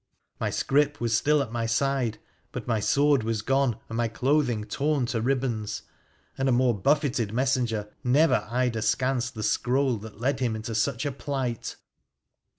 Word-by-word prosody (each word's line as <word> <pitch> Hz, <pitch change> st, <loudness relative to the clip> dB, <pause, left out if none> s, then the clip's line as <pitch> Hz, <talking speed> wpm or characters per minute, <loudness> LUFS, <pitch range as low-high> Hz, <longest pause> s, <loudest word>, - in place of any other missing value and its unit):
My -, -, 0 dB
scrip 145 Hz, +1 st, +1 dB
was 115 Hz, -1 st, +1 dB
still 150 Hz, +4 st, +3 dB
at 115 Hz, -, -9 dB
my 115 Hz, -1 st, -2 dB
side, 125 Hz, -2 st, 0 dB, 0.3 s
but -, -, -6 dB
my 115 Hz, -2 st, 0 dB
sword 140 Hz, +5 st, +3 dB
was 110 Hz, -1 st, -2 dB
gone, 135 Hz, -2 st, +1 dB
my 115 Hz, +1 st, -1 dB
clothing 125 Hz, -1 st, +1 dB
torn 140 Hz, +3 st, 0 dB
to 120 Hz, -1 st, -2 dB
ribbons, 120 Hz, -4 st, -1 dB, 0.6 s
and 135 Hz, 0 st, +2 dB
a -, -, +3 dB
more 125 Hz, 0 st, +3 dB
buffeted 130 Hz, -1 st, +1 dB
messenger 120 Hz, -4 st, 0 dB, 0.2 s
never 125 Hz, -3 st, +3 dB
eyed 125 Hz, 0 st, 0 dB
askance 120 Hz, +4 st, 0 dB
the 110 Hz, -3 st, -7 dB
scroll 125 Hz, +4 st, +1 dB
that 105 Hz, 0 st, -11 dB
led 130 Hz, +3 st, 0 dB
him 120 Hz, -4 st, 0 dB
into 110 Hz, +1 st, -5 dB
such 115 Hz, +5 st, 0 dB
a 145 Hz, -, 0 dB
plight. 130 Hz, -4 st, -3 dB
125 Hz, 160 wpm, -26 LUFS, 115-135 Hz, 0.6 s, still